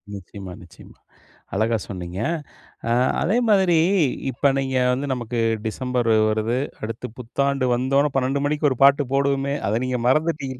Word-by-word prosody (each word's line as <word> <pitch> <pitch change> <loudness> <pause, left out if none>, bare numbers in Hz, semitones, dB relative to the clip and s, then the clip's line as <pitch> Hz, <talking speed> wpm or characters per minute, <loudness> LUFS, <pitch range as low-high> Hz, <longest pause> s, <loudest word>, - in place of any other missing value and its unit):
நிச்சயமா 95 0 -9
நிச்சயமா. 85 - -16 0.6
அழகா 110 +3 +1
சொன்னீங்க. 90 -1 -6 0.7
அ - - +1 0.3
அதே 200 +8 +1
மாதிரி, 190 -5 +4 0.5
இப்ப 140 +3 +2
நீங்க 135 -1 -1
வந்து 135 +3 -2
நமக்கு 120 -1 -4 0.3
டிசம்பர் 125 +1 -1 0.2
வருது, 110 +3 0 0.2
அடுத்து 115 +3 -5
புத்தாண்டு 135 +2 -1
வந்தோன்ன 135 +4 +1
12 135 +1 0
மணிக்கு 150 0 +1
ஒரு 130 - -2
பாட்டு 140 +1 +5
போடுவோமே! 140 0 +1
அத 110 +3 +1
நீங்க 130 -1 -1
மறந்துட்டீங்க. 140 -2 0
130 Hz, 135 wpm, -22 LUFS, 115-140 Hz, 0.7 s, பாட்டு